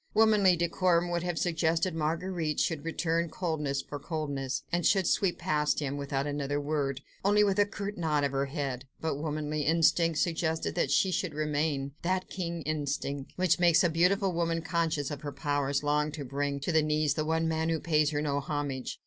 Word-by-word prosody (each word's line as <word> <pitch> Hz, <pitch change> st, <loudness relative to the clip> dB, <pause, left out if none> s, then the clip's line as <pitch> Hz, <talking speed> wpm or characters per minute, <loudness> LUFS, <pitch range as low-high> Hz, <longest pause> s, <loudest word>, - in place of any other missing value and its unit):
Womanly 210 Hz, -4 st, +5 dB
decorum 175 Hz, 0 st, +1 dB
would 170 Hz, 0 st, 0 dB
have 175 Hz, -1 st, -2 dB
suggested 165 Hz, +1 st, +1 dB
that -, -, -5 dB
Marguerite 165 Hz, 0 st, -1 dB
should 160 Hz, -4 st, 0 dB
return 165 Hz, 0 st, -1 dB
coldness 150 Hz, -6 st, -2 dB
for 145 Hz, -, -7 dB
coldness, 140 Hz, -3 st, -3 dB
and 175 Hz, 0 st, 0 dB
should 190 Hz, 0 st, +3 dB
sweep 175 Hz, -1 st, +1 dB
past 150 Hz, -4 st, +1 dB
him 140 Hz, -2 st, -2 dB
without 140 Hz, -1 st, -2 dB
another 145 Hz, 0 st, -2 dB
word, 145 Hz, -2 st, -2 dB, 0.2 s
only 205 Hz, +2 st, +4 dB
with 200 Hz, -1 st, +1 dB
a 205 Hz, -, +4 dB
curt 205 Hz, -1 st, -5 dB
nod 155 Hz, -3 st, +1 dB
of 140 Hz, -, +1 dB
the 135 Hz, 0 st, 0 dB
head: 135 Hz, -3 st, -4 dB
but 160 Hz, -3 st, -2 dB
womanly 150 Hz, 0 st, -2 dB
instinct 165 Hz, +1 st, +3 dB
suggested 160 Hz, -1 st, 0 dB
that 170 Hz, -, 0 dB
she 190 Hz, -, +3 dB
should 170 Hz, -3 st, -2 dB
remain—that 150 Hz, +4 st, -1 dB
keen 170 Hz, -3 st, -4 dB
instinct, 145 Hz, -2 st, -3 dB
which 180 Hz, -2 st, +2 dB
makes 170 Hz, -1 st, +5 dB
a 175 Hz, -, +2 dB
beautiful 185 Hz, +3 st, +2 dB
woman 165 Hz, -1 st, 0 dB
conscious 160 Hz, -4 st, -1 dB
of 145 Hz, -1 st, -5 dB
her 145 Hz, -, -5 dB
powers 140 Hz, 0 st, -1 dB
long 150 Hz, +1 st, +1 dB
to 145 Hz, -3 st, -5 dB
bring 140 Hz, +2 st, -2 dB
to 145 Hz, -, -1 dB
her 160 Hz, -1 st, +4 dB
knees 150 Hz, -1 st, +1 dB
the 155 Hz, -, -1 dB
one 160 Hz, +1 st, 0 dB
man 160 Hz, 0 st, 0 dB
who 165 Hz, -1 st, 0 dB
pays 155 Hz, -3 st, +2 dB
her 150 Hz, -1 st, -1 dB
no 145 Hz, -1 st, 0 dB
homage. 140 Hz, -2 st, -3 dB
155 Hz, 190 wpm, -29 LUFS, 145-170 Hz, 0.2 s, Womanly